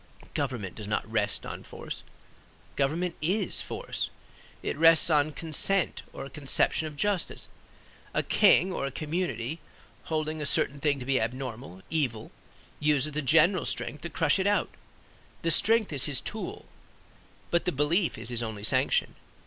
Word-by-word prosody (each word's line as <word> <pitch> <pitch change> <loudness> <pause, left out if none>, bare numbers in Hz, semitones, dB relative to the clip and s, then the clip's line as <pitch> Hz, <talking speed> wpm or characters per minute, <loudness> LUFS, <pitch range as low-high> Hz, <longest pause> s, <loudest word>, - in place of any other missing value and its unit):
Government 100 -8 -3
does 105 -2 -8
not 105 - -1
rest 110 -2 -1
on - - -6
force. - - -8 0.7
Government 165 +6 0
is 185 +4 +1
force; - - -4 0.5
it - - -2
rests 165 +2 +6
on 150 0 +3
consent 165 +4 +2
or - - -7
a - - -9
conception 150 +2 +1
of 150 - -9
justice. 200 +3 -1 0.6
A - - 0
king 185 +2 +4
or 140 - -2
a - - -5
community 155 - -3 0.5
holding 155 -1 -2
a 150 - -2
certain 140 0 +1
thing 145 -2 +1
to 125 - -7
be 135 -2 +1
abnormal, 120 -4 -5
evil, 130 -9 -2 0.5
uses 150 -1 +2
the 150 +1 -2
general 165 +6 +4
strength 150 - 0
to 170 - -5
crush 160 -1 +1
it 190 - +1
out; 205 0 +1 0.7
the 165 - +2
strength 215 +2 +4
is 135 - +3
his 140 -4 +2
tool, 365 - -5 0.9
but 170 - +2
the 180 - +1
belief 165 +5 +1
is - - -4
his 120 -1 -1
only 110 -3 -5
sanction. - - +2
150 Hz, 155 wpm, -28 LUFS, 130-170 Hz, 0.9 s, rests